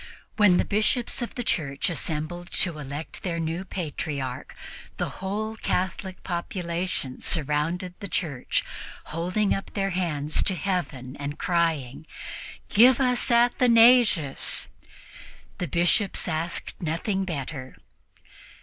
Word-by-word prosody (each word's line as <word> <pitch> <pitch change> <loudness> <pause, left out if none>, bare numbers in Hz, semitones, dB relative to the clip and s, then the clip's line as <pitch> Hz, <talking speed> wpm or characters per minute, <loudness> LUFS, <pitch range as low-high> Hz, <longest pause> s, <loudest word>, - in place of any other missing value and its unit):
When 205 -4 +6
the - - +2
Bishops 215 +5 +1
of 240 - -4
the 245 - -2
Church 140 -9 0
assembled 170 +1 -3
to 170 -5 +2
elect 145 +2 -6
their 170 -3 -2
new 165 +3 -2
Patriarch, 145 -8 -4 0.4
the - - -1
whole 215 +3 -2
Catholic 185 -2 -2
population 175 -5 -3
surrounded 165 +4 0
the 200 - -5
church, 155 -8 -1 0.5
holding 180 +5 +1
up 195 - -5
their 195 -1 0
hands 155 -5 0
to 190 - 0
Heaven 150 -8 -2
and 145 +1 -4
crying, 160 -5 0 0.6
"Give 245 +4 +6
us 250 -2 +2
Athanasius!" 235 - +4 0.9
The 180 - -1
Bishops 175 - +1
asked 165 0 -3
nothing 180 +4 -1
better. 140 -6 -5
175 Hz, 115 wpm, -26 LUFS, 150-195 Hz, 0.9 s, When